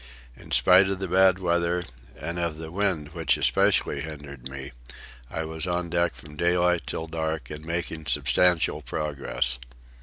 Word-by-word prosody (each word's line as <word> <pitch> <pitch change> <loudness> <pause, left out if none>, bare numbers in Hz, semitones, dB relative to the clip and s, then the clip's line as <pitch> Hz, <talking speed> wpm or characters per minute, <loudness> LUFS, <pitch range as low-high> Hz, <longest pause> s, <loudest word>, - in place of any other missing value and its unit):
In - - -14
spite 95 +1 +5
of 95 - -1
the 95 0 -3
bad 95 +1 +5
weather, 85 -1 +1 0.4
and 85 +4 -4
of 85 -3 -1
the 80 0 -7
wind 90 -6 0
which 80 -5 +1
especially - - +2
hindered 70 -4 -8
me, 65 0 -7 0.6
I 80 - -3
was 80 +2 -2
on 90 -1 -1
deck 85 0 +1
from 75 0 -12
daylight 90 +1 +2
till 80 - -3
dark 80 -1 -3
and 75 0 -7
making 80 -1 -3
substantial 80 +5 +2
progress. 70 -5 -1
80 Hz, 155 wpm, -26 LUFS, 75-90 Hz, 0.6 s, spite